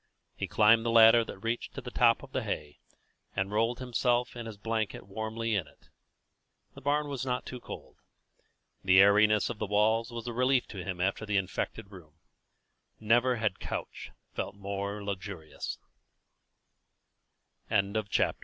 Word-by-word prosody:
He - - -3
climbed 110 +1 +5
the 115 - 0
ladder 115 0 +7
that - - -8
reached 115 +1 -3
to 140 - -5
the 125 -1 -8
top 120 0 +3
of 135 - -12
the 130 - -1
hay, 75 -9 -5 0.6
and 95 +1 -1
rolled 115 +3 +1
himself 125 -1 0
and 120 -1 -6
his 110 -2 -8
blanket 110 -1 -3
warmly 110 +3 -3
in 95 -7 0
it. - - -23 0.8
The - - -12
barn 145 +2 +1
was 140 -3 -4
not 125 -1 -2 0.2
cold. - - -10 0.9
The 95 0 +6
airiness 105 +1 +5
of 105 - -8
the 105 - -2
walls 110 +3 +2
was 115 -1 -6
a 120 - -4
relief 125 +1 +2
to 95 -4 -6
him 90 -1 -5
after 100 +3 0
the 105 -1 0
infected 95 +1 -3
room. 80 -6 -14 0.8
Never 120 +3 +3
had 110 -5 -1
couch - - -6 0.2
felt - - -4
more 100 +1 -4
luxurious. 95 -5 -5
110 Hz, 150 wpm, -30 LUFS, 100-120 Hz, 0.9 s, ladder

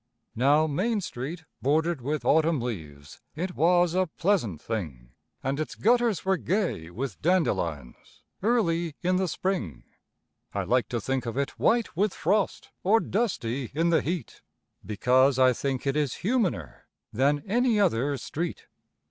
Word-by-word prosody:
Now, 145 +6 +4
Main 200 +9 0
Street 160 0 -5 0.2
bordered 160 +2 +1
with 150 +4 -2
autumn 160 -1 +3
leaves, 80 -12 -7
it 180 +4 -3
was 175 +1 +3
a 185 0 +2
pleasant 160 - 0
thing, 75 - -5 0.3
And 135 +2 -1
its 155 - -3
gutters 235 -3 +2
were 190 0 +2
gay 180 - -1
with 125 +9 -5
dandelions 90 - -1 0.2
early 175 -8 +1
in 180 +1 +2
the 190 0 +1
Spring; 105 - -3 0.7
I - - 0
like 125 0 +1
to 120 - -1
think 130 +3 -2
of 115 - -4
it 140 0 0
white 230 -6 +2
with 200 +3 +1
frost 200 +4 0
or 215 +5 +4
dusty 140 - -2
in 165 +2 +2
the 165 - +4
heat, 170 -4 -4 0.4
Because 125 +5 +3
I 130 -1 +5
think 135 +1 -3
it 135 0 0
is 150 -1 -1
humaner 225 -2 -1 0.3
than 140 +4 +2
any 235 +1 +2
other 145 - +2
street. 165 +7 -4
155 Hz, 150 wpm, -27 LUFS, 125-185 Hz, 0.7 s, I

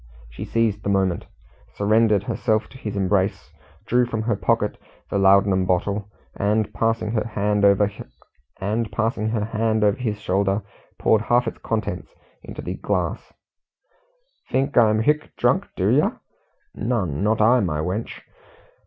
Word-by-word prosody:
She - - -7
seized 110 -3 0
the 100 - -3
moment, 95 -3 0 0.5
surrendered 105 -1 +3
herself 110 0 0
to 130 - -13
his 105 -4 -5
embrace, 95 -3 0 0.3
drew 125 +2 +2
from 110 -2 -3
her 115 -1 0
pocket - - 0 0.3
the 100 - +1
laudanum 95 -1 +4
bottle, 100 +3 -1 0.3
and 105 +1 0
passing 115 -1 0
her 110 -1 0
hand 105 -1 0
over 100 0 +5 2.1
his 110 -5 -2
shoulder, 100 +1 0 0.3
poured 110 - +3
half 120 +1 +2
its - - -5
contents 110 -1 -4 0.3
into - - -9
the - - -3
glass. - - -2 1.2
"Think 135 +2 0
I'm 110 -2 +4
hic 150 +4 0
drunk, - - +1
do - - +1
yer? - - +2 0.5
Nun 100 - -2
not 110 +1 +2
I, 115 +4 +5
my 85 -8 -1
wench." 90 +8 -3
105 Hz, 130 wpm, -23 LUFS, 100-115 Hz, 2.1 s, over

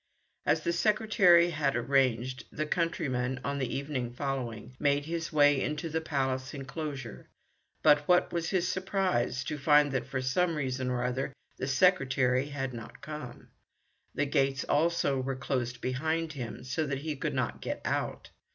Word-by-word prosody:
As - - +3
the 170 - 0
secretary 185 -3 +4
had 145 -4 0
arranged, 125 -1 +1
the 155 - -2
countryman, 130 -6 -1
on 140 0 -2
the 130 - -2
evening 135 -4 -3
following, 125 -3 -4
made 145 0 +2
his 165 0 -3
way 145 -3 +5
into 150 +2 -2
the 160 +1 -1
Palace 135 -2 -2
enclosure, 135 -3 -6 0.5
but 150 -1 +5
what 180 0 +3
was 170 -1 -1
his 185 -2 +1
surprise 185 -10 0
to 150 -2 -4
find 145 0 +5
that, 135 -1 -2
for 135 -1 -2
some 165 +7 +1
reason 130 -3 -2
or 125 -1 -1
other, 130 +2 -2 0.2
the 130 - -3
secretary 135 -5 +3
had 135 -3 -4
not 115 -1 -9
come. 150 -5 -8 0.7
The 145 - +1
gates, 135 -2 +1
also, 160 -4 +1
were 135 +1 -2
closed 125 -2 -2
behind 160 +5 -1
him, 125 -5 -6
so 130 +5 -2
that 140 -1 -2
he 155 0 -3
could 135 - -3
not - - -2
get - - -3
out. - - -2
140 Hz, 160 wpm, -30 LUFS, 130-160 Hz, 0.7 s, way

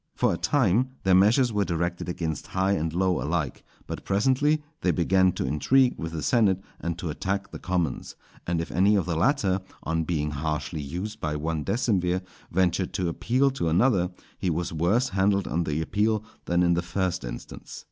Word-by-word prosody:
For - - +2
a - - -2
time 125 -2 +2
their 95 - +3
measures 110 +6 +4
were 105 -1 +2
directed 85 0 -2
against 80 -4 -3
high 95 +1 +3
and 80 -4 0
low 90 +2 +1
alike; 75 -3 -2 0.2
but - - -6
presently 135 +9 +2 0.2
they 90 - +1
began 95 +2 +3
to - - -2
intrigue 120 - +3
with 80 0 -4
the 80 -3 -4
senate, 100 - +3 0.2
and 85 0 -3
to 85 -2 -3
attack 100 +5 -3
the - - -7
commons; 90 -7 -2 0.3
and 85 -1 0
if 80 - -4
any 100 +4 +4
of 95 -5 +1
the 85 -2 -1
latter, 95 - +2 0.2
on 80 0 0
being 75 -3 -1
harshly 75 +2 -3
used 90 +10 -5
by 75 -1 -2
one 80 0 -2
decemvir, 95 - 0 0.3
ventured 90 +1 +1
to 90 -2 0
appeal 130 +10 +1
to 110 -11 -1
another, 90 0 +3 0.3
he 95 - 0
was 85 +1 -2
worse 100 +11 +2
handled 100 -1 +1
on 85 +1 -1
the 75 +1 -1
appeal 105 +4 +1 0.2
than 85 +1 +2
in 85 0 +4
the 85 - +1
first 90 -1 -2
instance. - - -8
90 Hz, 190 wpm, -26 LUFS, 80-100 Hz, 0.3 s, measures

